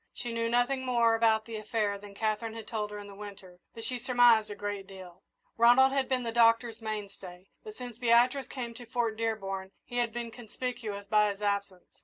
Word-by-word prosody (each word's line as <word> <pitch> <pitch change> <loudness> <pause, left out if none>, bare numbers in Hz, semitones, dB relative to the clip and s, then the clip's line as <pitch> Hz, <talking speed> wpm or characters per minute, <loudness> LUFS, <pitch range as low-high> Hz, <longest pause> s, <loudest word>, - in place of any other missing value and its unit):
She 240 -2 -5
knew 230 0 0
nothing 245 +3 +1
more 235 -3 +3
about 225 -1 +3
the 225 -2 -6
affair 215 -1 -1
than 200 0 -12
Katherine 220 +1 -2
had 225 -2 -7
told 215 -2 -3
her 210 - -7
in 205 - -8
the 200 - -11
winter, 195 -3 -10 0.2
but 225 0 -7
she 250 +1 -2
surmised 240 -3 +4
a 205 - -6
great 205 -1 -5
deal. 185 -3 -12 0.4
Ronald 245 +3 +6
had 275 -1 0
been 255 -1 +1
the 230 - -2
Doctor's 230 0 +3
mainstay, 200 -4 -7
but 215 - -9
since 245 -2 -8
Beatrice 245 +2 +3
came 240 -4 -6
to 240 0 -11
Fort 230 -2 -1
Dearborn 195 -4 -3 0.2
he 245 - -6
had 240 -2 +1
been 235 0 -5
conspicuous 225 -3 -6
by 210 0 +4
his 200 +1 -6
absence. 200 -3 -3
225 Hz, 205 wpm, -30 LUFS, 205-240 Hz, 0.4 s, Ronald